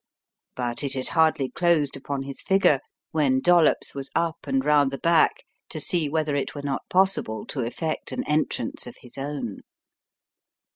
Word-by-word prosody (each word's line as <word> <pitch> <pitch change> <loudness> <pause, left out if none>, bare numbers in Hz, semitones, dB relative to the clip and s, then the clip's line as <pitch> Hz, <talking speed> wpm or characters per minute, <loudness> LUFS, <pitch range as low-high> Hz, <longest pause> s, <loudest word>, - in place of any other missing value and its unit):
But 120 +1 -2
it 140 - -1
had 130 - -2
hardly 160 -5 +2
closed 170 -5 +2
upon 140 0 -4
his 135 -1 -6
figure 190 -8 +3 0.3
when 140 -4 +2
Dollops 175 +1 +3
was 140 -1 -6
up 165 -1 -1
and 270 0 0
round 145 -2 +4
the 135 - -5
back 170 - +3 0.3
to - - -5
see 170 -5 0
whether 155 -1 0
it 140 - -2
were 145 - -6
not 140 -1 -2
possible 185 - +1
to 140 - -5
effect 155 +7 -3
an - - -3
entrance 150 -6 -1
of 120 - -9
his 125 - -13
own. 135 -7 -4
145 Hz, 165 wpm, -25 LUFS, 135-165 Hz, 0.3 s, round